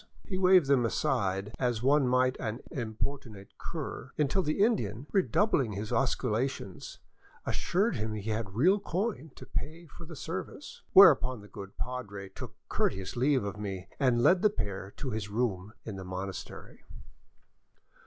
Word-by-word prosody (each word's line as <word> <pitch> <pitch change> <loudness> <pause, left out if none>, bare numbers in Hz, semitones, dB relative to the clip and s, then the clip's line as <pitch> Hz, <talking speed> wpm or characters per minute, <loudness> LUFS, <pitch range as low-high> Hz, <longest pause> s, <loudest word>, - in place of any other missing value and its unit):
He 190 - -4
waved 185 -3 +6
them 135 -3 +3
aside 105 -6 0
as 120 -3 0
one 140 0 +4
might 130 +1 +3
an 115 +1 -3
importunate 115 -4 -5
cur, - - -6
until 150 +6 +2
the 155 +4 +1
Indian, 125 - 0
redoubling 190 - +2
his 105 +2 -5
osculations, 125 -5 -1 0.5
assured 200 - 0
him 110 0 -2
he 105 +1 -3
had 110 -3 -3
real 185 - +4
coin 195 -2 -2
to - - -11
pay 165 +3 -5
for 170 +2 -12
the 165 0 -9
service, 185 - -6
whereupon 130 - +7
the 105 - -13
good 100 0 -10
padre 100 -6 -5
took 95 - -9
courteous 95 -1 -1
leave 130 0 +2
of 100 0 -5
me 95 -3 -5
and 125 -4 +3
led 180 +5 +5
the 210 - +5
pair 100 - -4
to 130 - -4
his 105 -1 -3
room 105 -3 -1
in 105 -4 -5
the 95 - -6
monastery. 95 +1 -7
125 Hz, 155 wpm, -30 LUFS, 105-155 Hz, 0.5 s, whereupon